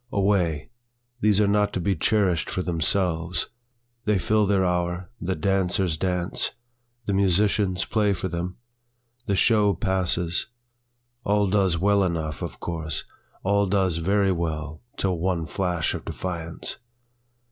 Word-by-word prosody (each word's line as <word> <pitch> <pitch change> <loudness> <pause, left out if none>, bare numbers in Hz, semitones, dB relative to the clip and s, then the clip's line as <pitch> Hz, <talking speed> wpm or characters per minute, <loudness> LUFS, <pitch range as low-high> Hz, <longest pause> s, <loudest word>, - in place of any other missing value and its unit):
Away! 95 -5 +1 0.5
these 105 -3 +3
are 105 - +4
not 105 0 +2
to - - -1
be 95 +2 +1
cherishâd 90 -1 +1
for 95 - -2
themselves, 85 0 0 0.6
They 105 -2 +3
fill 105 +3 +2
their 95 -2 +3
hour, 90 +2 -1
the 95 +1 -1
dancers 95 0 +1
dance, 90 +2 -1 0.5
the 100 - -1
musicians 100 0 +2
play 105 -2 +2
for 95 0 -3
them, 90 +1 -4 0.7
The 100 - +1
show 105 -1 +4
passes, 90 -2 0 0.8
all 105 0 +2
does 95 -3 +2
well 100 +3 +3
enough 80 -4 -2
of - - -5
course, 80 -4 -3 0.4
All 100 +1 +2
does 95 -3 +1
very 95 +3 +2
well 80 -3 -3 0.2
till 95 -3 0
one 85 -2 0
flash 85 0 -1
of - - -5
defiance. 85 -2 -5
95 Hz, 135 wpm, -25 LUFS, 85-100 Hz, 0.8 s, are